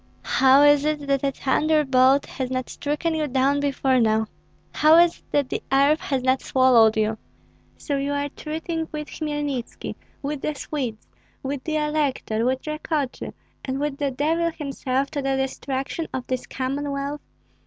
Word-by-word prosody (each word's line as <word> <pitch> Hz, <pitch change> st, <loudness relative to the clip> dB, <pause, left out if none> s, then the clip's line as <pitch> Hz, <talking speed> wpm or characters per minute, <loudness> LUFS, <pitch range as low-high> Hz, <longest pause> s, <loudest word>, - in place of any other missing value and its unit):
How 265 Hz, +2 st, +5 dB
is 290 Hz, -1 st, +6 dB
it, 300 Hz, -1 st, -1 dB
that 275 Hz, -1 st, 0 dB
a 280 Hz, -, +3 dB
thunderbolt 275 Hz, -1 st, +3 dB
has 260 Hz, -2 st, -4 dB
not 255 Hz, -1 st, -3 dB
stricken 300 Hz, +3 st, -2 dB
you 310 Hz, -1 st, -1 dB
down 270 Hz, +2 st, +2 dB
before 270 Hz, -2 st, +1 dB
now? 220 Hz, -1 st, +2 dB, 0.5 s
How 310 Hz, +2 st, +5 dB
is 345 Hz, 0 st, +4 dB
it -, -, -32 dB
that 285 Hz, -3 st, +1 dB
the -, -, -3 dB
earth 280 Hz, +3 st, +4 dB
has 265 Hz, -3 st, -2 dB
not 260 Hz, 0 st, +2 dB
swallowed 240 Hz, -4 st, +4 dB
you? 220 Hz, 0 st, 0 dB, 0.6 s
So 285 Hz, -3 st, -2 dB
you 280 Hz, +1 st, -1 dB
are 285 Hz, 0 st, -1 dB
treating 320 Hz, +2 st, -4 dB
with 300 Hz, -1 st, -5 dB
Hmelnitski, 295 Hz, -5 st, -4 dB, 0.3 s
with 285 Hz, 0 st, -3 dB
the 305 Hz, -, -2 dB
Swedes, 260 Hz, -6 st, -5 dB, 0.4 s
with 270 Hz, 0 st, -4 dB
the 315 Hz, -, -1 dB
elector, 295 Hz, -7 st, 0 dB
with 260 Hz, +1 st, -1 dB
Rakotsy, 305 Hz, -3 st, -3 dB, 0.3 s
and 265 Hz, 0 st, -3 dB
with 290 Hz, -1 st, -2 dB
the 285 Hz, -1 st, +1 dB
devil 320 Hz, +6 st, 0 dB
himself 275 Hz, -3 st, -2 dB
to 285 Hz, -, -2 dB
the 270 Hz, 0 st, 0 dB
destruction 270 Hz, +4 st, -3 dB
of 255 Hz, -1 st, -4 dB
this 255 Hz, -1 st, -3 dB
Commonwealth? 280 Hz, +2 st, -3 dB
280 Hz, 165 wpm, -24 LUFS, 260-300 Hz, 0.6 s, is